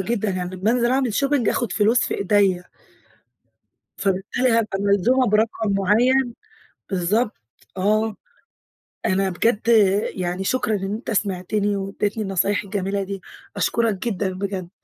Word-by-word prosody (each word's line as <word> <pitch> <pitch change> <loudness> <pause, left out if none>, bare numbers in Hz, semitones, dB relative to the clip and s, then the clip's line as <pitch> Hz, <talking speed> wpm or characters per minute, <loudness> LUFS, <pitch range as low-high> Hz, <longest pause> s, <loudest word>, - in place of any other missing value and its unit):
جدًا، 215 +1 -1
يعني 185 0 -3
أمّا 190 +5 0
أنزل 240 0 +2
أعمل 260 -4 +1
shopping 275 -3 +1
آخُد 235 -7 0
فلوس 220 +3 +3
في - - -1
إيدَيَّ. 195 -2 +2 1.4
فبالتالي 195 +6 0
هابقى 225 -4 +1
ملزومة 205 +6 +3
برقم 215 0 +1
معين، 240 +6 +2 0.6
بالضبط 200 +5 0 0.4
آه. 215 +3 +1 0.9
أنا 190 0 +1
بجد 210 +4 +1 0.5
يعني 180 0 -2
شكرًا 220 0 0
إن 195 0 -3
أنت 220 +4 -5
سمعتني 200 +1 0
واديتني 205 +2 -2
النصايح 195 +1 0
الجميلة 200 0 -2
دي، 195 0 -6 0.3
أشكرك 230 -3 +1
جدًا 195 -3 -1
بجد. 190 -2 -4
205 Hz, 125 wpm, -22 LUFS, 190-230 Hz, 1.4 s, فلوس